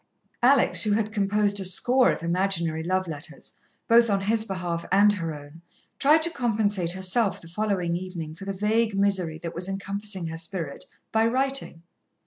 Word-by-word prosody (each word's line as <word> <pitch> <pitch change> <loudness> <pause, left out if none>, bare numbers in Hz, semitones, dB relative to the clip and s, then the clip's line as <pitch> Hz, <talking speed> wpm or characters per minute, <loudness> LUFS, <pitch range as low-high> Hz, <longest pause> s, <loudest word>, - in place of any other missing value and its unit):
Alex, 260 +2 +4
who 210 -2 +3
had 215 0 0
composed 205 0 +1
a - - -3
score 245 +8 +3
of - - -5
imaginary 170 -2 0
love 185 +2 -1
letters, 155 -1 -8 0.3
both 230 0 +5
on 200 -1 +1
his 220 +3 +1
behalf 180 -5 -4
and 205 +2 +5
her 165 -5 -4
own, 145 +3 -13 0.4
tried 305 +3 +5
to 335 - +4
compensate 210 - 0
herself 190 +3 +1
the 165 - -13
following 180 -2 -1
evening 175 -3 -6
for 180 +5 -11
the 195 - -3
vague 210 +2 0
misery 190 -5 +1
that 165 +1 -7
was 175 +3 -5
encompassing 195 -1 -3
her 165 0 -5
spirit, 165 -4 -4 0.3
by 220 0 +2
writing. 260 -7 -1
195 Hz, 170 wpm, -25 LUFS, 170-215 Hz, 0.4 s, both